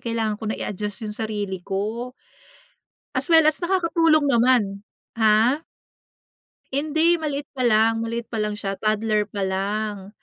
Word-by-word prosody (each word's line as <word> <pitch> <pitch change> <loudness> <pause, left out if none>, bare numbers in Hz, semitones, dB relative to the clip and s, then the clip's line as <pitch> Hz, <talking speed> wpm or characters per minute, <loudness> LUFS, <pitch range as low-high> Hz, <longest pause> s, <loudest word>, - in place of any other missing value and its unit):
kailangan 225 -2 -2
ko - - -6
na - - -2
i-adjust 210 +2 -5
yung 210 - -4
sarili 205 -4 -4
ko. 215 +7 -3 1.0
As 260 +5 -1
well 325 -2 +6
as 310 +3 +2
nakakatulong 335 -4 +2
naman, 235 -6 +2 0.3
ha? 230 +7 +3 1.1
Hindi, 315 +4 +2
maliit 290 -2 -3
pa 260 - -4
lang, 225 -1 +3
maliit 230 0 -3
pa 220 - -1
lang 210 0 -2
siya, 195 -1 -3
toddler 215 -1 +1
pa 200 -1 -2
lang. 200 +1 -3
225 Hz, 140 wpm, -23 LUFS, 210-280 Hz, 1.1 s, well